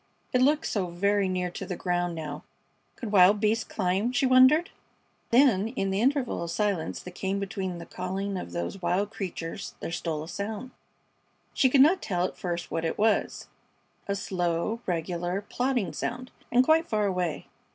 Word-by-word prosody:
It 250 - +3
looked 295 +4 +3
so 195 -4 -1
very 200 +3 +1
near 180 -1 -1
to - - -6
the 180 - -4
ground 175 -1 -1
now. 150 -2 -6 0.5
Could 225 -4 -6
wild 200 +1 +6
beasts 220 +1 +2
climb, 195 +3 0
she 250 +1 +1
wondered? 260 +6 +6 0.6
Then 230 -5 +4
in 195 -5 0
the 195 +2 0
interval 265 0 +1
of 170 - -4
silence 195 -2 -1
that 180 - -8
came 190 +2 -2
between 195 -3 -3
the 170 - -8
calling 190 +2 -4
of 180 - -5
those 85 - -4
wild 185 +4 0
creatures 175 -6 -5
there - - -5
stole 160 -3 -3
a - - -9
sound. 215 +6 -5 0.8
She 260 - +4
could 265 +1 +5
not 340 +7 +5
tell 180 -2 0
at - - -4
first 175 -1 -4
what 165 - -1
it 165 - -2
was. 220 0 +1 0.6
A 200 - 0
slow, 180 +3 -1
regular, 175 +1 -1
plodding 245 - -1
sound, 250 +10 -4 0.2
and 245 +1 +5
quite 320 +2 +4
far 210 -1 +1
away. 180 -5 -1
195 Hz, 175 wpm, -27 LUFS, 175-230 Hz, 0.8 s, wild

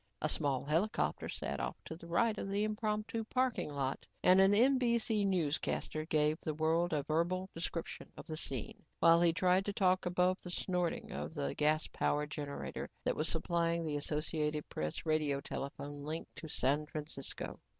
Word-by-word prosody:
A - - 0
small 135 -3 +2
helicopter 165 +9 0
sat - - -3
off - - -2
to 160 - -6
the 170 +1 -12
right 215 +6 +2
of 195 - -4
the 200 +1 +1
impromptu 215 +1 -1
parking 255 -4 0
lot 140 -2 -3 0.2
and 185 +1 +7
an 195 +1 +6
NBC 235 -2 +3
newscaster 155 -3 -1
gave 155 -1 +2
the 155 - -3
world 165 +3 +2
a 150 -3 0
verbal 175 +5 0
description 165 0 -5
of - - -8
the 155 - -5
scene 135 -6 -3 0.2
while 165 0 +6
he 170 -1 +5
tried 185 +2 +3
to 205 - -2
talk 185 -2 +2
above 180 +1 +2
the 180 - -8
snorting 180 -1 -1
of 160 - -5
the 145 -2 -1
gas 155 +1 +2
powered 150 0 0
generator 145 -2 -5
that - - +1
was 155 - 0
supplying 170 0 0
the 150 -2 -1
Associated 150 0 -1
Press 75 - -3
radio 155 -3 +1
telephone 140 +1 -6
link 155 +3 -4
to 160 - -7
San 150 +1 +1
Francisco. 150 -3 -4
165 Hz, 170 wpm, -34 LUFS, 150-185 Hz, 0.2 s, and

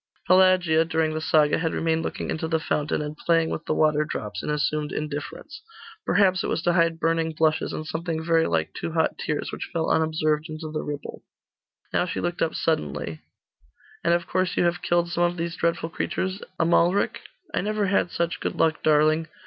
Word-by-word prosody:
Pelagia, 185 -3 +5
during 160 -1 0
the 155 - -3
saga, 155 -2 +3
had 165 -1 -1
remained 165 0 +1
looking - - -4
into 160 +1 -2
the 160 0 +1
fountain, 150 -1 -1
and 150 0 -5
playing 165 +1 +1
with - - -4
the - - 0
water 150 -1 +3
drops, 105 - -5
in - - -5
assumed 150 0 -1
indifference. 150 - -5 0.5
Perhaps 185 -3 +3
it - - -1
was 165 - -1
to 175 - +2
hide 165 -1 +2
burning 165 -1 +1
blushes, 155 0 +1
and 155 - -5
something 160 0 -3
very 165 -1 +3
like - - -1
two 165 - -5
hot 160 -1 +1
tears, 150 -1 -2
which - - -6
fell 165 -2 0
unobserved 155 0 +1
into 155 0 -6
the 155 - -2
ripple. 145 -1 -6 0.7
Now 180 - +2
she - - -3
looked 175 0 -3
up 160 - +1
suddenly 75 - -2 0.8
'And 170 0 +4
of 170 0 -2
course 185 0 -1
you - - +3
have 175 0 +1
killed 175 0 +1
some 175 - +1
of 175 0 +1
these 170 0 -3
dreadful 170 -1 -1
creatures, 190 +3 -3 0.2
Amalric?' 170 +3 +2 0.3
'I - - +1
never 210 +1 0
had 190 -2 +1
such 170 0 -2
good - - -3
luck, 160 -1 +1
darling. 155 +1 +3
160 Hz, 195 wpm, -25 LUFS, 155-175 Hz, 0.8 s, Pelagia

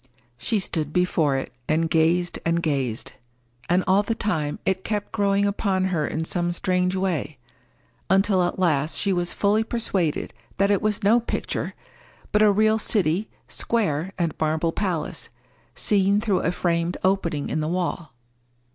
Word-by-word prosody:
She 220 - 0
stood 155 -6 -2
before 160 -5 +2
it, 135 - -5 0.2
and 160 +1 +2
gazed 170 +2 +2
and 165 0 0
gazed; 135 -7 -1 0.6
and 180 +2 +3
all 190 +2 +4
the 225 +2 -2
time 155 -10 -1
it 190 0 0
kept 210 -2 -3
growing 200 -1 +2
upon 195 -2 0
her 155 -3 0
in 160 +1 -2
some 175 +1 -1
strange 180 +1 0
way, 165 -7 -2 0.7
until 195 0 +3
at 175 - 0
last 160 -5 +1
she 200 - +1
was 175 -1 0
fully 210 +2 +2
persuaded 200 -9 -1 0.2
that 200 +1 +3
it 200 - +2
was 210 -2 -1
no 220 +4 +5
picture, 235 - -3 0.6
but 210 - +3
a 215 -1 +6
real 215 +2 +3
city, 200 -2 +1 0.2
square, 190 -7 -1
and 170 -3 0
marble 160 +1 +1
palace, 170 -6 -3 0.5
seen 200 0 +2
through 210 -4 +1
a 170 - +1
framed 170 -1 0
opening 175 -6 0
in - - -1
the 155 - -1
wall. 170 -2 -2
180 Hz, 155 wpm, -24 LUFS, 160-200 Hz, 0.7 s, a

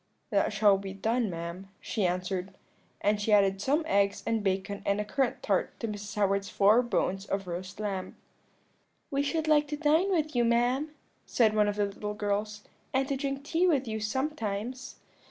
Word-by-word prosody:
"'That 200 0 +2
shall 205 -1 +4
be 195 -1 -6
done, 225 +3 0
ma'am,' 170 +2 -6
she 210 -6 -1
answered; 185 +1 -3 0.5
and 210 0 +1
she 215 - 0
added 195 -2 +4
some 290 +8 +1
eggs 200 -8 +1
and 225 -2 0
bacon 195 +1 -1
and 200 +1 +1
a 210 - -1
currant 265 +3 -1
tart - - 0
to 230 - -2
Mrs. 205 -1 -6
Howard's 200 -1 +1
four 210 +4 +5
bones 195 -5 -1
of 195 0 -2
roast 180 +2 -6
lamb. 195 -3 -3 1.0
"'We 280 0 +1
should 315 +2 -1
like 300 -1 +4
to 295 0 -4
dine 320 +5 +3
with 310 -6 0
you, 240 - +3
ma'am,' 245 +5 +2 0.4
said 220 -3 +3
one 210 -1 +4
of 205 - -1
the 205 0 +1
little 210 +1 -5
girls, 210 0 -2 0.3
'and 265 0 +2
to 275 - +1
drink 275 0 -3
tea 335 +5 +2
with 275 -7 +2
you 220 0 -2
sometimes.' 240 0 -3
210 Hz, 185 wpm, -29 LUFS, 200-265 Hz, 1.0 s, four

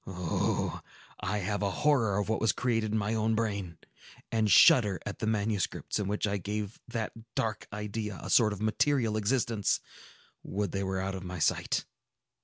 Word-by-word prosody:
Oh, 90 -3 -1 0.4
I 100 +3 -1
have 105 0 -1
a 100 - +1 0.2
horror 115 -10 +3
of 105 - 0
what 110 - 0
was 110 -4 +3
created 115 -3 0
in 110 - +1
my 105 +1 0
own 110 0 +1
brain, 100 -6 -2 0.5
and 110 -2 +2
shudder 105 +1 +6
at 105 - -5
the 110 - -2
manuscripts 105 -2 -1
in 100 - -1
which 105 +2 0
I 100 0 0
gave 105 +2 -4
that 115 -3 -3 0.2
dark 110 -1 -2
idea 105 0 -4
a - - -6
sort 110 -3 +5
of 105 0 -5
material 115 0 +2
existence! 110 -1 +1 0.6
Would 100 +1 -3
they 100 0 -2
were 95 0 -1
out 95 +1 -2
of 95 -1 -6
my 90 0 -6
sight!" 80 - +1
105 Hz, 180 wpm, -30 LUFS, 100-110 Hz, 0.6 s, shudder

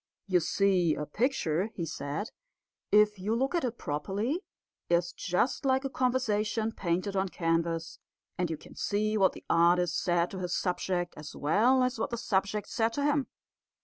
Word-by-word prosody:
"You 185 -3 +3
see, 180 -2 +2
a 150 - -3
picture," 195 - 0
he 170 - -2
said, 155 +5 -4 0.6
"if 210 -1 +5
you 210 +4 0
look 265 +5 0
at 345 - +1
it 240 -2 -2
properly, 205 - -2 0.5
is 175 0 +2
just 180 +12 0
like 265 0 +2
a 270 - -2
conversation 225 -4 0
painted 185 0 -2
on 190 0 +1
canvas; 165 -1 -1 0.4
and 180 -2 -1
you 160 - -3
can - - -14
see 215 +1 0
what 195 -3 +4
the - - -12
artist 170 0 +3
said 175 -1 +1
to 190 - -5
his 180 -1 -2
subject 180 -1 -1
as 150 0 -8
well 235 - +3
as 250 -2 -1
what - - -1
his 235 0 -4
subject 200 +1 0
said 225 0 0
to 285 - -1
him. 290 -2 +2
195 Hz, 175 wpm, -30 LUFS, 170-230 Hz, 0.6 s, if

